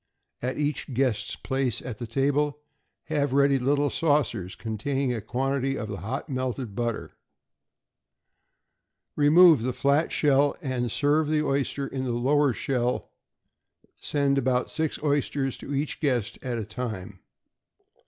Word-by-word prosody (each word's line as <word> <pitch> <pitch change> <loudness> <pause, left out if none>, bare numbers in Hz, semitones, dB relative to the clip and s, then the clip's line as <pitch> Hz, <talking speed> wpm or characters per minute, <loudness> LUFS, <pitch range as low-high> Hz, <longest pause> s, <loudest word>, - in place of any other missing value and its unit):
At 125 +1 -2
each 145 -1 -1
guest's 115 -5 0
place 130 -4 -1
at 115 -4 -7
table 145 +4 +1 0.5
have 145 -3 -1
ready 140 0 +4
little 145 +2 +1
saucers 145 - 0
containing 125 +4 -2
a 115 - -3
quantity 135 +4 -1
of 110 - -4
the 100 - -4
hot 115 - -4
melted 130 -4 -3
butter. 120 -1 -2 2.0
Remove 155 -1 +7
the 125 +2 -1
flat 140 +5 +2
shell, 145 -1 +3
and 130 -7 -2
serve 150 +4 +2
the 155 0 +1
oyster 140 0 0
in 135 -1 -4
the 120 - -1
lower 140 +4 +3
shell; 125 0 -1 0.9
send 140 -1 +1
about 125 -1 0
six 160 -1 -1
oysters 140 -2 0
to - - -8
each 145 +2 -2
guest 125 -8 -1
at 125 -3 -2
a 110 - -3
time. 105 -4 -6
135 Hz, 135 wpm, -26 LUFS, 120-145 Hz, 2.0 s, Remove